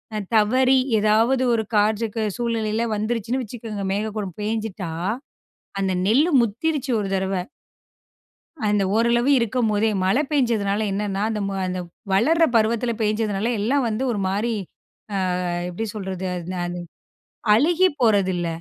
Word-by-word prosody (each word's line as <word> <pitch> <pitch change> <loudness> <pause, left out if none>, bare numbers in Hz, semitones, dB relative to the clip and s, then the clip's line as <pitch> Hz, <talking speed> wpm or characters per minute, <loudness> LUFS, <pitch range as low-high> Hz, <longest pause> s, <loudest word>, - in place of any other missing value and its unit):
அ - - -1 0.2
தவறி 255 +5 +4 0.2
ஏதாவது 225 +5 +3
ஒரு 220 -1 +1
காற்றுக்கு 215 +1 +1
சூழ்நிலையில 230 -1 -1
வந்துருச்சுன்னு 230 +4 -1
வச்சுக்கோங்க. 215 -3 -6
மேகக்கூட்டம் 210 -3 -3
பேஞ்சிட்டா, 210 -5 -3 0.9
அந்த 190 -1 0
நெல்லு 285 - +4
முத்திருச்சு 270 +5 -1
ஒரு 200 - -3
தடவ. 190 0 -1 1.3
அந்த 205 -1 +2
ஓரளவு 235 +3 +3
இருக்கும்போதே, 220 -2 +1
மழை 195 +10 +3
பெஞ்சதுனால, 220 -7 +1
என்னன்னா 200 0 -2
அந்த 215 -1 -2
ம 195 - -3 0.2
அந்த 180 0 -3 0.3
வளர்ற 320 +12 +4
பருவத்தில 230 +2 +2
பேய்ஞ்சதுனால 215 +1 0
எல்லாம் 255 +5 +1
வந்து 220 +4 -2
ஒரு 205 - -2
மாரி 210 +5 0 0.9
அ - - -1 0.2
எப்படி 220 +6 -4
சொல்றது? 190 -2 -4
அத் 175 0 -6
ந - - -4
அது 175 0 -4 0.7
அழுகிப் 330 - +3
போறதில்ல. 190 -6 +2
220 Hz, 125 wpm, -23 LUFS, 200-235 Hz, 1.3 s, தவறி